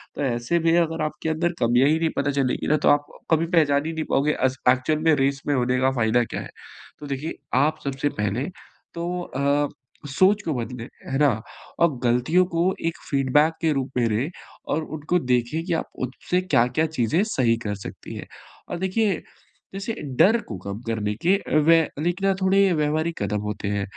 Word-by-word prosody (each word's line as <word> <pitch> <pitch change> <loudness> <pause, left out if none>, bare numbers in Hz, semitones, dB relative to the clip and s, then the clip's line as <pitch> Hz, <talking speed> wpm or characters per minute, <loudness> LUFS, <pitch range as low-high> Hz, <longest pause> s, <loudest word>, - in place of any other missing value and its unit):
तो - - -4
ऐसे 120 +5 0
में 165 +1 +3
अगर 165 -1 0
आपके 155 +1 -3
अंदर 170 +2 0
कमियाँ 120 +3 +4
ही 160 +1 +2
नहीं 165 -1 +1
पता 140 +1 +1
चलेंगी 135 -2 -1
ना, 155 - +3
तो 150 - +2
आप 145 0 +4
अ, - - -14 0.2
कभी 160 +1 0
पहचान 145 -3 +3
ही 165 - -3
नहीं 160 -1 -2
पाओगे 145 +3 +2
अस 130 0 0
एक्चुअल 130 +5 +2
में 160 -1 +5
रेस 135 0 0
में 145 - +2
होने 125 0 +1
का 130 0 +3
फ़ायदा 120 -1 +2
क्या - - -5
है? - - -9 0.5
तो 150 - -8
देखिए, 140 +3 -4 0.2
आप 155 +4 +2
सबसे 140 +1 -1
पहले 105 +6 -1 0.5
तो 175 +1 -3
अ, 140 -1 0 0.4
सोच 190 +9 +3
को 160 - 0
बदलें, 120 -1 -5 0.2
है 135 - 0
ना? 145 -2 +5 0.5
और 170 -6 +3
गलतियों 125 +10 +3
को 175 +3 +2
एक 165 - -2
फीडबैक 145 +3 +3
के 160 -2 +2
रूप 135 -1 -2
में 120 -2 +3
रे 115 +8 0 0.4
और 155 +2 0
उनको 155 +3 -1
देखें 125 +6 +1
कि 175 - -1
आप 165 - -2 0.2
उससे 180 +8 -2
क्या-क्या 125 -4 +2
चीज़ें 155 - +1
सही 125 - +1
कर 105 -1 -1
सकती - - -9
हैं। - - -7 0.4
और 175 - -3
देखिए, 190 +2 0 0.5
जैसे 195 +4 -4 0.3
डर 220 +5 +6
को 105 - -5
कम 100 +2 -6
करने 105 -2 -1
के 185 - +5 0.3
व 155 - +2 0.3
लेकिन 175 +3 0
ना 195 - +4
थोड़े 195 +1 +4
व्यवहारिक 155 0 -1
कदम 105 0 -1
होते 105 0 -4
हैं, 100 0 -1
145 Hz, 200 wpm, -24 LUFS, 125-165 Hz, 0.5 s, डर